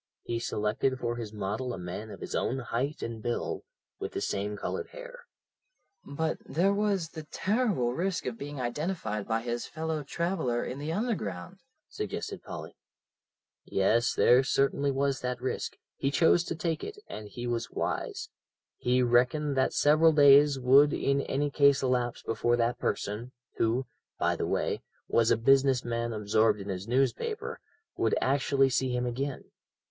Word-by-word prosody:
He 115 0 -2
selected 115 +4 0
for 120 -1 -2
his 115 -3 -5
model 110 +4 -3
a - - -8
man 90 +5 -6
his - - -7
own 130 - 0
height 135 +3 -3
and 115 -1 -5
build, 120 +2 -2 0.4
with - - -5
the - - -2
same 105 +1 -2
coloured 455 - -3
hair." - - -11 0.8
"But 155 +3 -2
there 185 +6 +1
was 200 -5 0
the 155 -2 -9
terrible 200 - +1
risk 180 +4 -1
of 125 - -2
being 140 +3 -7
identified 120 - -2
by 115 0 0
his 120 0 -3
fellow 160 -1 -3
traveller 160 -5 -1
in 130 - -5
the 150 +2 -3
Underground," 165 - -3 0.3
suggested - - -5
Polly. - - -8 0.9
"Yes, 115 +5 +2
there 125 +2 +5
certainly 140 +1 +1
was 140 0 0
that 125 -1 -2
risk; 130 +1 -3 0.2
he 135 - 0
chose 165 +4 +4
to 165 - -3
take 165 -1 -2
it, 425 - -6
and 105 - -8
he 120 +3 -7
was 120 -1 -2
wise. - - -3 0.5
He 125 +1 +2
reckoned 125 +5 +2
that 130 0 +2
several 155 +2 +5
days 145 -1 +7
would 135 +3 +5
in 140 0 +1
any 145 +1 -1
case 140 -1 +4
elapse 125 -2 0
before 120 +2 +1
that 120 +1 0
person, 115 +5 -3 0.2
who, 120 +4 +1 0.3
by - - +1
the - - -2
way, - - -1 0.3
was 115 -1 +3
a - - +4
business 135 +1 +4
man 115 0 -2
absorbed 110 0 +2
in 100 +1 -7
his 95 +1 -4
newspaper, 135 - -1 0.4
would 115 - +2
actually 135 0 +2
see 130 +1 +1
him 125 0 0
again. 130 +3 -4
130 Hz, 160 wpm, -29 LUFS, 115-150 Hz, 0.9 s, days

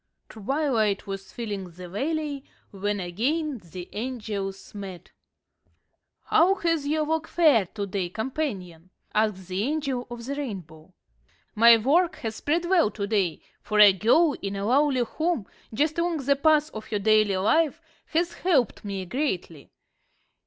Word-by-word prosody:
Twilight 225 -3 0
was 195 -1 -7
filling 205 -5 -5
the 180 +1 -10
valley 285 - -3 0.3
when 205 +1 -2
again 255 - -1
the 175 +1 -9
angels 210 -5 -5
met. 195 -4 -8 1.1
"How 365 +4 +4
has 330 -6 0
your 310 +1 +1
work 320 +1 -1
fared 270 - +3
to 205 -2 -2
day, 190 -2 -3
companion?" 195 - -4 0.2
asked 210 -4 0
the 185 +1 -2
Angel 275 -1 -2
of 240 -1 -8
the 275 - -3
Rainbow. 185 - -7 0.6
"My 230 +1 +7
work 315 +10 +2
has 220 -2 -5
sped 335 +4 0
well 345 - +3
to 200 -1 -4
day, 195 -7 0 0.2
for 210 -1 -1
a 205 -2 +9
girl 280 - +3
in 195 0 -3
a 200 0 -3
lowly 270 +2 +3
home, 315 - -2 0.3
just 300 +8 0
along 340 -1 0
the 280 +1 +4
path 305 +1 +3
of 215 - -8
her 210 - -1
daily 215 -1 +3
life, 295 +11 +2 0.3
has 340 +2 0
helped 290 - +1
me 195 -2 -4
greatly. 180 - -3
225 Hz, 145 wpm, -26 LUFS, 195-300 Hz, 1.1 s, a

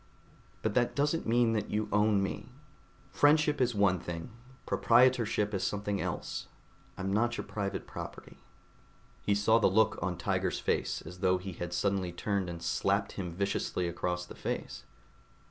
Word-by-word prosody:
But 110 - 0
that 120 +1 +1
doesn't 150 +3 0
mean 115 0 +3
that 105 -2 -1
you 105 +1 -1
own 105 -1 +3
me. 95 - -4 0.6
Friendship 150 -1 +4
is 120 -2 +2
one 100 -3 +3
thing; 85 +6 -6 0.3
proprietorship 115 -4 +3
is 95 -1 -1
something 105 -1 -1
else. - - -4 0.5
I'm 95 +1 -2
not 120 +3 +1
your - - -4
private 100 -2 -3
property." - - -9 0.8
He 100 - +1
saw 110 +3 +4
the - - +4
look 110 +4 +3
on - - -2
Tiger's - - -1
face, - - -1
as 90 - -10
though 95 -1 +3
he 95 +1 -6
had 85 +1 -5
suddenly 95 0 0
turned 95 +1 -1
and 85 -1 -7
slapped 100 +3 +1
him 90 -3 -4
viciously 95 -1 -1
across 90 +1 -2
the - - -10
face. - - -5
100 Hz, 160 wpm, -31 LUFS, 95-115 Hz, 0.8 s, Friendship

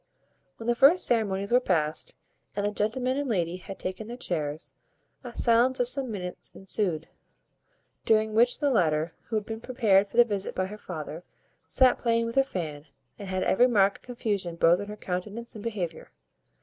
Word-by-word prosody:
When 225 - -9
the 240 - +2
first 280 +9 +5
ceremonies 200 -4 0
were 245 - +6
past, 180 - 0 0.4
and 205 - -1
the 205 - 0
gentleman 250 +6 -1
and 285 -2 -2
lady 175 -5 -1
had 195 +1 -9
taken 190 +4 -5
their 240 +1 -7
chairs, 155 -7 -3 0.5
a 245 -2 -9
silence 240 +2 +4
of 245 - +4
some 260 0 +4
minutes 180 -4 -6
ensued; 185 -5 -2 1.0
during 220 -1 +2
which 240 +3 +4
the 285 -1 +2
latter, 160 -7 +1 0.2
who 225 - -2
had 210 -1 -1
been 220 0 -6
prepared 215 -6 +2
for 230 - -10
the 240 - +8
visit 205 -4 -3
by 185 - 0
her 210 +3 -9
father, 160 -2 -7 0.4
sat 255 -1 +4
playing 230 -1 +1
with 230 - -4
her 270 - +4
fan, 155 - -6 0.3
and 200 - -7
had 185 0 -1
every 245 +6 +4
mark 200 -5 +3
of - - -34
confusion 205 -8 -3
both 170 +1 +4
in 205 - -5
her 210 0 -8
countenance 210 +6 -5
and 215 - -9
behaviour. 185 -8 -4
210 Hz, 190 wpm, -27 LUFS, 185-240 Hz, 1.0 s, the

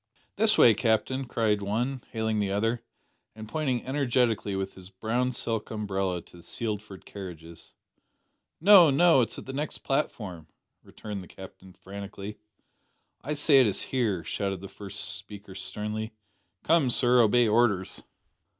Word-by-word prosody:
"This 220 0 +4
way, 115 - +7
Captain," 120 +4 0
cried 110 -4 0
one, 120 +6 -2
hailing 110 -1 -1
the 100 -2 0
other, 115 +4 0 0.5
and 110 0 -9
pointing 130 -2 -2
energetically 125 -6 0
with 95 0 -3
his 95 -1 -12
brown 115 +6 -1
silk 115 -3 -2
umbrella 95 -4 -2
to - - -17
the - - -13
Sealford 105 -1 -5
carriages. 85 -4 -10 0.8
"No, 185 -2 +8
no. 160 0 +5
It's 115 - -2
at - - -8
the 135 - -7
next 145 +2 -4
platform," 100 - -2 0.3
returned 105 -2 -8
the 90 - -12
Captain 95 0 -13
frantically. 100 +2 -9 0.8
"I 150 +4 -2
say 145 -2 +5
it 125 - +4
is 100 - 0
here," 110 -10 -1
shouted 95 -1 -3
the 100 - -7
first 100 +1 -7
speaker 100 0 -5
sternly. 105 +3 -3 0.5
"Come, 160 -5 +3
sir, 125 0 +5
obey 120 +2 +4
orders!" 105 -4 +1
110 Hz, 145 wpm, -27 LUFS, 100-125 Hz, 0.8 s, No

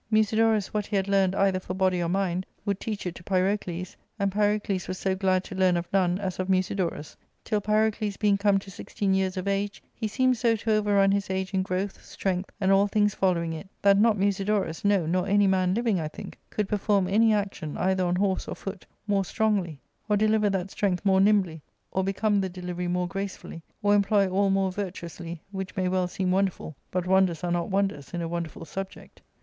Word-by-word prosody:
Musidorus 220 -1 +2
what 210 -1 -1
he - - -3
had 195 0 +1
learned 195 -1 +2
either 195 -2 +2
for 185 0 -6
body 185 -1 +2
0T^ 170 -1 -1
mind 185 -1 -1 0.2
would 200 -2 -1
teach 210 -3 -4
it 180 - -2
to 175 - -12
Pyrocles, 185 -1 -1 0.2
and 200 -2 0
Pyrocles 205 -2 0
was 185 +1 -4
so 190 0 0
glad 185 -1 +1
to - - -9
learn 185 -2 +3
of 170 0 -3
none 180 -2 +2
as 190 -2 -4
of 185 - -1
Musidorus; 185 -5 -1 0.3
till 210 -2 -1
Pyrocles 215 0 +1
being 210 -2 +3
come 200 0 +3
to 195 0 -7
sixteen 195 +1 -2
years 190 0 0
of 185 +1 -3
age, 200 +1 -2
he 220 - -3
seemed 255 +3 +2
so 230 -1 +2
to 220 +1 -2
overrun 205 -2 +3
his 200 0 0
age 190 +1 -2
in 190 - +2
growth, 190 +1 -3
strength, 190 -1 -3
and 190 -2 +2
all 195 +1 +5
things 210 0 +2
follow 180 -3 +1
ing 165 -1 -3
it, 160 +4 -8
that 200 0 +6
not 215 +1 +4
Musidorus, 195 -3 0
no, 200 -4 +3
nor 180 +3 0
any 205 +1 +4
man 185 -1 +2
hving, 225 -5 +1
I 155 - -2
think, 155 - -10
could 210 -2 -2
perform 200 -2 +1
any 220 +4 +4
action, 195 -7 -2
either 190 0 +1
on 175 0 +1
horse 190 0 0
or - - -4
foot, 195 -2 -8 0.2
more 200 -2 +1
strongly, 190 -7 0 0.3
or 210 - +3
deliver 215 0 +3
that 190 -1 -2
strength 190 -2 -1
more 190 -1 +4
nimbly, 195 -6 +2 0.3
or 190 - 0
become 200 +1 +1
the 190 - -2
delivery 180 0 -5
more 180 0 0
gracefully, 195 -2 -6 0.2
or 205 0 +4
employ 200 0 +3
all 195 +2 +1
more 195 -1 +1
virtuously, 175 -3 -6
which 190 -1 -5
may 185 -2 0
well 185 0 +1
seem 185 +1 -2
wonderful: 190 -5 -1
but 180 -1 -2
wonders 185 -3 +2
are 175 - -1
not 170 -1 -1
wonders 195 -5 -1
in 170 - -2
a - - -2
wonderful 170 -1 -5
subject. 195 +3 -8
195 Hz, 210 wpm, -26 LUFS, 185-205 Hz, 0.3 s, that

